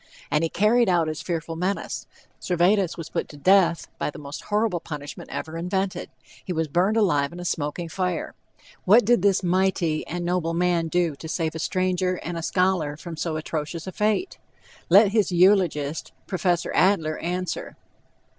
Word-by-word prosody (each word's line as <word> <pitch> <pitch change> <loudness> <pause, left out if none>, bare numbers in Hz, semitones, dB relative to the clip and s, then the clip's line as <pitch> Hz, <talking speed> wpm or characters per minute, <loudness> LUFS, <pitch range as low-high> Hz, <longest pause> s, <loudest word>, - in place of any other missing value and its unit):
And 150 +2 +2
he 165 - +1
carried 215 +4 +3
out 170 -3 +2
his 155 0 -4
fearful 165 -2 -3
menace; 185 +4 -3 0.3
Servetus 180 +1 +2
was 165 - -7
put - - -2
to 145 - -11
death 185 +1 +4
by - - -1
the - - -9
most 145 0 -8
horrible 210 -3 0
punishment 150 -2 -8
ever 160 +1 -5
invented 190 +2 -2 0.3
he - - -5
was 160 -2 -1
burned 180 +8 +1
alive 145 -10 +2
in 175 - -9
a 175 - -6
smoking 160 +1 -2
fire. 180 0 -2 0.5
What 215 +4 +6
did 240 -3 +4
this 195 -1 +2
mighty 180 -3 +1
and 175 +1 -4
noble 175 -2 0
man 175 -1 +1
do 170 -2 0
to 160 - -8
save 160 0 -2
a 160 - -6
stranger 185 +1 0
and 175 +1 -4
a 165 - -3
scholar 175 -4 0
from 165 +1 -8
so 160 0 -2
atrocious 155 +1 -4
a 190 - -5
fate? 215 - -1 0.5
Let 200 +4 +7
his 205 -3 +1
eulogist, 175 -5 +2
Prof. 185 -2 -3 0.3
Adler, 165 -5 +2
answer. 180 +1 -4
175 Hz, 175 wpm, -24 LUFS, 160-190 Hz, 0.5 s, Let